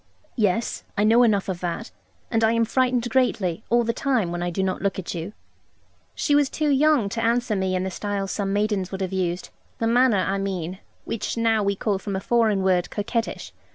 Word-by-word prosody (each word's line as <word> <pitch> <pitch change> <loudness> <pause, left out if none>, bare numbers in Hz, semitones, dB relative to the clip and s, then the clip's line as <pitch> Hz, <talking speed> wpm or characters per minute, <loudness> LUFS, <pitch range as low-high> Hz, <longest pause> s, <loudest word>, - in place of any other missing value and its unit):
'Yes, 215 -1 0
I 205 - +3
know 225 +3 +5
enough 210 -5 +3
of 185 -3 -3
that; 180 +6 -4 0.4
and 225 -1 +2
I 220 +1 +4
am 230 0 +2
frightened 250 0 +1
greatly, 220 -7 0
all 240 +1 +4
the 230 0 0
time, 240 -9 0
when 175 0 -3
I 175 - -1
do 185 +2 -2
not 185 -1 -1
look 195 -1 -1
at 190 - -4
you.' 170 +3 -5 0.8
She 290 - 0
was 290 -2 +4
too 305 -1 -1
young 285 -4 +3
to 230 +3 -3
answer 235 -1 +1
me 190 -1 0
in 185 - 0
the 190 - -3
style 200 +1 -3
some 195 0 -2
maidens 205 -2 0
would 190 0 -5
have 190 0 -2
used; 180 -1 -2 0.3
the 230 - -1
manner, 230 -4 +3
I 195 +1 0
mean, 185 -2 -3 0.3
which 230 - -3
now 225 -1 +2
we 200 0 +1
call 200 0 -1
from 200 0 -4
a - - -1
foreign 215 -2 +2
word 180 -2 +2
'coquettish.' 225 +2 -3
205 Hz, 215 wpm, -24 LUFS, 190-230 Hz, 0.8 s, know